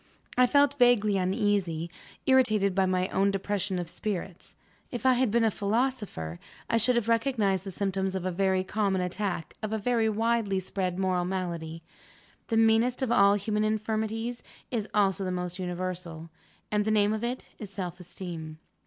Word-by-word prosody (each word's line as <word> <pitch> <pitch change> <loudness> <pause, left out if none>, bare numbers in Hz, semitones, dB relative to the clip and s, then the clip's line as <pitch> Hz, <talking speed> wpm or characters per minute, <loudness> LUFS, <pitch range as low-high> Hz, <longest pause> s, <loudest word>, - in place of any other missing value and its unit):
I 250 0 +5
felt 285 +1 +3
vaguely 230 -4 +4
uneasy; 185 -4 0 0.4
irritated 215 -7 +4
by 190 0 +2
my 185 0 +1
own 195 +1 +2
depression 195 -1 -1
of 175 -1 -3
spirits. 190 0 -5 0.3
If 245 +1 -6
I 260 - +6
had 250 -1 +2
been 235 +2 +2
a 220 - +3
philosopher, 205 - -2 0.3
I 230 - +2
should 245 +3 +3
have 235 -2 0
recognized 225 -5 +1
the 195 - -5
symptoms 190 0 -1
of 185 -1 -3
a 185 - 0
very 190 +1 +1
common 195 -1 0
attack 180 -2 -3
of 215 -1 -3
a 220 - 0
very 225 +1 +1
widely 220 -2 +1
spread 185 -1 -3
moral 185 -2 +1
malady. 170 -3 -4 0.6
The 225 - 0
meanest 225 +3 +3
of 245 - 0
all 200 -1 +5
human 210 +1 -1
infirmities 220 +2 -1 0.3
is 220 -4 -2
also 195 -1 +2
the 185 - -2
most 180 0 -4
universal; 180 -2 -4 0.4
and 210 0 +2
the 220 - -1
name 210 -1 +3
of 220 +1 -3
it 245 +2 -3
is 210 - -7
Self 185 -2 -5
esteem. 170 -3 -7
200 Hz, 170 wpm, -28 LUFS, 185-225 Hz, 0.6 s, I